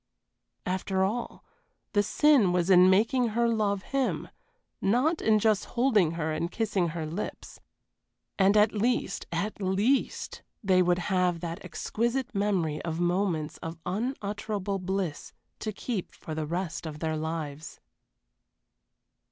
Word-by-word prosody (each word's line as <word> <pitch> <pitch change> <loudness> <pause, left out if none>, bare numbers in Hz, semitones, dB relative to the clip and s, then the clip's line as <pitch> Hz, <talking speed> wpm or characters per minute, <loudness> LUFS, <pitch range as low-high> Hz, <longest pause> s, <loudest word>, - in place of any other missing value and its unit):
After 190 +1 0
all, 225 +5 -3 0.5
the 205 - +4
sin 235 -1 +4
was 180 +1 +1
in 180 0 +8
making 230 +5 +3
her 235 0 +3
love 205 -4 0
him, 275 -2 -1 0.5
not 260 - +2
in 220 -1 +4
just 215 -1 +2
holding 220 -10 +2
her 160 -1 -2
and 165 +3 -2
kissing 210 -6 0
her 160 -1 -4
lips. 170 +7 -6 0.8
And 195 +2 +5
at 210 +1 +5
least, 235 +4 0
at 190 +6 -3
least, 200 +8 0 0.2
they 185 -2 +4
would 175 -1 +3 0.2
have 180 -2 +2
that 170 -1 -5
exquisite 240 +3 -2
memory 190 -7 0
of 165 -1 -3
moments 175 -3 0
of 165 0 -7
unutterable 205 -2 -2
bliss 185 -4 -3 0.3
to 215 - -3
keep 210 -1 -4
for 160 - -7
the 155 -1 -3
rest 170 0 -3
of 150 -1 -6
their 160 0 -2
lives. 155 -1 -5
190 Hz, 135 wpm, -28 LUFS, 170-215 Hz, 0.8 s, in